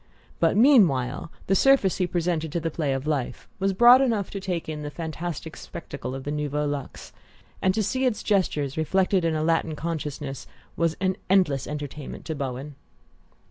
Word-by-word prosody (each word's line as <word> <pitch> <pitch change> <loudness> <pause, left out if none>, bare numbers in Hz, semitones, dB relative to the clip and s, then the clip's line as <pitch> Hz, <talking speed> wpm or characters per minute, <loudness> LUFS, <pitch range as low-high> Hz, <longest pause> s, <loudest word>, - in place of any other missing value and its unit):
But - - +3
meanwhile 165 - +4
the 195 - +1
surface 265 -3 +4
he 185 - +1
presented 170 -3 -1
to 170 - 0
the 165 0 -3
play 150 -3 -1
of 135 +1 -3
life 145 -5 -2
was 195 0 +1
broad 240 +6 +7
enough 225 -7 0
to 200 - -4
take 180 -3 -3
in 155 -1 -4
the 145 - -4
fantastic 160 0 -5
spectacle 140 -5 -7
of 135 - -6
the 145 - -3
Nouveau 150 0 -1
Luxe; 145 -2 -5 0.5
and 190 - +3
to 220 - +1
see 260 +6 0
its 220 -4 -2
gestures 155 -9 0
reflected 185 +3 +2
in 165 -1 +1
a 155 - 0
Latin 165 -1 +1
consciousness 150 -4 -5 0.3
was 165 -1 0
an 185 -1 0
endless 180 -8 +3
entertainment 150 -1 -6
to 160 - -3
Bowen. 140 0 -5
160 Hz, 180 wpm, -25 LUFS, 145-190 Hz, 0.5 s, broad